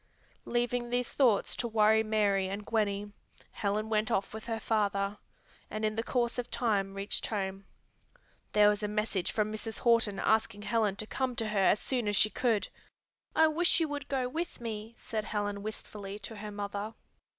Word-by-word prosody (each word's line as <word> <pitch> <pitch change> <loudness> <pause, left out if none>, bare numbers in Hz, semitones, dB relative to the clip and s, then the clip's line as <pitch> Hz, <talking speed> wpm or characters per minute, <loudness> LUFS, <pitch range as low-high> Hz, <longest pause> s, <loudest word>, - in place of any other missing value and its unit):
Leaving 240 0 0
these 245 0 -1
thoughts 235 -8 +3
to 240 - -2
worry 220 -1 +4
Mary 205 -3 +2
and 205 +2 -4
Gwenny, 205 -2 0 0.4
Helen 210 +1 -1
went 215 -1 +1
off 195 +1 0
with 220 +1 -7
her 225 -1 -2
father, 205 -2 0 0.5
and 215 0 -2
in 215 0 0
the 225 - 0
course 240 0 0
of 245 - -3
time 200 -5 0
reached 200 +1 -1
home. 195 -2 -3 0.9
There 210 -1 +7
was 210 0 0
a 210 - 0
message 210 -3 -1
from 215 0 0
Mrs. 220 +1 -4
Horton 230 -4 +3
asking 220 -1 +1
Helen 210 -2 +1
to 215 - -4
come 255 +2 -2
to 225 -2 -2
her 210 -1 0
as 210 - +5
soon 245 -5 -1
as 205 - +1
she 215 +2 +5
could. 220 -7 +1 0.7
"I 320 - +7
wish 330 +3 +3
you 325 - +2
would 290 -1 -4
go 260 -2 0
with 330 +7 -4
me," 225 -1 -5
said 215 -1 -3
Helen 205 -1 -2
wistfully 205 -1 -6
to 210 +2 -8
her 210 +1 -6
mother. 205 +1 -4
215 Hz, 185 wpm, -31 LUFS, 205-235 Hz, 0.9 s, There